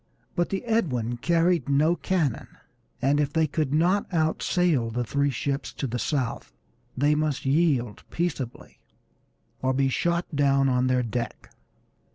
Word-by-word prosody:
But 175 -2 0
the 195 +5 -3
Edwin 125 - 0
carried 170 +1 +1
no 150 +5 +3
cannon, 165 -6 -1 0.6
and 140 +2 +3
if 145 -1 +1
they 160 0 +2
could 150 -2 -1
not 180 +8 +2
out 160 -2 +1
sail 165 -10 +1
the 120 +2 -2
three 140 +5 0
ships 140 +2 -2
to - - -4
the 125 -1 -3
south 130 -4 -2 0.5
they 145 +3 +3
must 150 -3 -1
yield 135 -6 +1
peaceably, 155 -8 -4 0.8
or 130 0 +1
be 135 0 +2
shot 170 +5 0
down 140 -1 +3
on 125 0 +2
their 125 -1 +2
deck. 120 +1 -4
140 Hz, 150 wpm, -26 LUFS, 130-165 Hz, 0.8 s, no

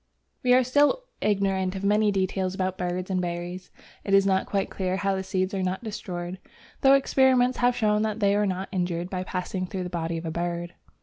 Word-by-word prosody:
We 250 -3 +5
are 255 - +5
still 290 - +3 0.2
ignorant 195 -2 +1
of 190 - -5
many 210 +1 +3
details 190 -1 -1
about 185 -1 -1
birds 180 +1 -3
and 185 -1 +1
berries. 175 +1 -5 0.3
It 195 - +2
is 195 0 +5
not 190 -1 +1
quite 195 -1 -1
clear 185 -1 -1
how 195 0 0
the 190 - -2
seeds 185 0 -1
are 195 - -1
not 185 +3 -2
destroyed, 185 -4 -5 0.4
though 270 0 +7
experiments 260 -2 +3
have 245 0 +3
shown 210 -2 +2
that 215 0 -1
they 200 -2 +3
are 205 0 +2
not 190 0 -3
injured, 175 -2 -2
by 185 -1 -2
passing 185 0 -3
through 185 0 -4
the 180 - -6
body 165 -1 -2
of 165 - -6
a 160 - -2
bird. 175 +1 -3
190 Hz, 210 wpm, -26 LUFS, 180-210 Hz, 0.4 s, though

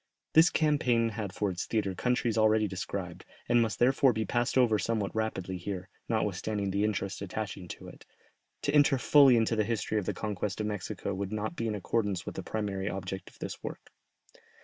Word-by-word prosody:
This 160 +2 +7
campaign 125 -7 +2
had 105 -3 -4
for 100 +1 -1
its 90 - -4
theatre 105 -4 0
countries 120 +2 0
already 110 -1 +4
described, 95 -1 -5 0.2
and 120 0 +4
must 110 -2 0
therefore 130 +1 +4
be 110 0 -1
passed 120 +1 0
over 115 -5 +4
somewhat 105 0 -1
rapidly 95 -4 -2
here, 95 +1 -5 0.2
notwithstanding 105 -2 -1
the 100 +2 +1
interest 100 -2 -2
attaching 100 -1 -5
to - - -9
it; - - -12 0.6
to 145 - 0
enter 145 -2 +5
fully 135 -1 +6
into 115 0 +2
the 110 - +2
history 110 0 -1
of 95 - -6
the - - -1
conquest 105 -2 -3
of 105 - -1
Mexico 105 -1 -3
would 95 +1 -3
not 110 +10 -3
be 115 - -2
in 110 - -1
accordance 100 -2 -1
with - - -5
the - - -5
primary 100 -2 -3
object 95 -1 -5
of - - -21
this - - -6
work. - - -8
105 Hz, 195 wpm, -30 LUFS, 100-115 Hz, 0.6 s, This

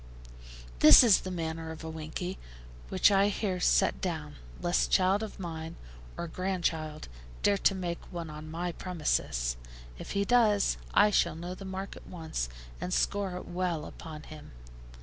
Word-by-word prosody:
This - - +10
is 225 -5 +6
the 185 - -5
manner 165 -2 -4
of 160 0 -8
a - - -5
'winkey,' 160 +4 -5 0.5
which - - +4
I 200 0 +4
here 195 -2 -1
set - - +3
down, 155 -5 -4 0.2
lest 175 0 +1
child 190 +2 +3
of 220 -2 -6
mine, 165 -2 -5 0.4
or 170 - -3
grandchild, 165 -4 -2 0.4
dare 200 -1 +3
to 195 - +3
make 175 -2 -5
one 170 -3 -5
on 155 +1 -8
my 175 +2 -3
premises; 150 - -1 0.4
if - - -6
he 200 0 +1
does, 215 -3 +3 0.2
I 210 +1 +6
shall 170 -5 +2
know 175 +2 -5
the 195 +1 -9
mark 190 +1 -5
at - - -13
once, 160 - -4 0.3
and 180 - -3
score 195 -1 0
it - - -8
well 175 -3 -2
upon 155 -2 -9
him. 155 - -11
175 Hz, 165 wpm, -30 LUFS, 160-190 Hz, 0.5 s, This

